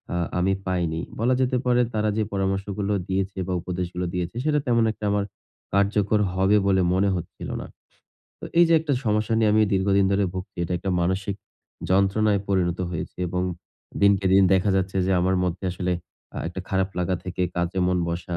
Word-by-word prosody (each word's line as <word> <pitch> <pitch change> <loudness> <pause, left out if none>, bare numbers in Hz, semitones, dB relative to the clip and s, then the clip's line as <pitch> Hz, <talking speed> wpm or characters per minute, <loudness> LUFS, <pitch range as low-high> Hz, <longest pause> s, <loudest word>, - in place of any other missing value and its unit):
আ - - 0 0.2
আমি 95 +2 +2
পাইনি। 85 -3 -1 0.2
বলা 120 +3 +2
যেতে 125 0 +1
পারে, 125 0 +3
তারা 110 0 +1
যে 110 - +2
পরামর্শগুলো 100 +1 -1 0.2
দিয়েছে, 95 0 -1
বা 95 - -1
উপদেশগুলো 90 0 -3
দিয়েছে, 90 +3 -3
সেটা 150 -1 +2
তেমন 115 -1 +3
একটা 110 - -7
আমার 100 -1 +1 0.5
কার্যকর 100 +1 +2
হবে 95 +3 +3
বলে 95 -1 +3
মনে 100 +2 +2
হচ্ছিল 85 -2 -6
না। - - -7 0.8
তো - - -7
এই 175 - +8
যে - - +3
একটা 155 -3 -2
সমস্যা 110 0 +1
নিয়ে 110 -2 +3
আমি 110 - +4
দীর্ঘদিন 100 +1 +3
ধরে 100 0 +2
ভুগছি। 95 +1 -7
এটা 85 - -4
একটা 95 - -3
মানসিক 95 +3 -1 0.5
যন্ত্রণায় 100 +2 +3
পরিণত 90 -3 +1
হয়েছে, 85 -3 -5
এবং 90 +1 -1 0.6
দিনকে 100 -1 +4
দিন 95 0 +6
দেখা 95 +2 +2
যাচ্ছে 95 0 -1
যে, 95 - +2
আমার 95 +1 +2
মধ্যে 90 +1 -3
আসলে 90 0 -2 0.4
আ - - -7
একটা 90 +2 -6
খারাপ 95 0 +1
লাগা 90 +1 0
থেকে 90 0 -3
কাজে 85 +2 -1
মন 90 0 +1
বসা 85 +1 -3
95 Hz, 185 wpm, -24 LUFS, 90-105 Hz, 0.8 s, এই